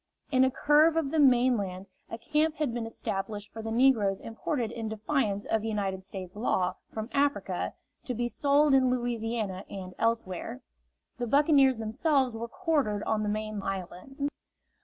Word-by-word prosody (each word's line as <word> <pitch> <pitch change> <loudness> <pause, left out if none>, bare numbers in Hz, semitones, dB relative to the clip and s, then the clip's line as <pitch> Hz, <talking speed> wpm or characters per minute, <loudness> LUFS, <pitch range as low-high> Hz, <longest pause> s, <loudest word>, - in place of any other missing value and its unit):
In 260 -1 +5
a 260 - +4
curve 300 +4 +4
of 295 -4 0
the 320 - +1
mainland 240 -9 +3 0.2
a 230 - -5
camp 305 +6 0
had 300 -7 -1
been 235 -1 -3
established 205 -1 -4
for 225 - -6
the 225 - -5
negroes 225 -5 +3
imported 230 +1 -3
in 225 -2 -4
defiance 215 -2 -1
of 220 -1 0
United 200 -4 -2
States 190 -1 -8
law, 200 -4 0 0.2
from 220 0 -4
Africa, 285 0 0 0.3
to 250 - -3
be 240 +1 0
sold 285 +3 +3
in 260 -1 +5
Louisiana 230 -5 -2
and 185 -2 -7
elsewhere. 225 - -1 0.6
The 240 - -1
buccaneers 275 -1 +4
themselves 255 +4 +1
were 230 +1 -4
quartered 275 - 0
on 220 -1 0
the 210 - -1
main 215 0 -3
island. 195 +10 -4
230 Hz, 160 wpm, -29 LUFS, 210-270 Hz, 0.6 s, In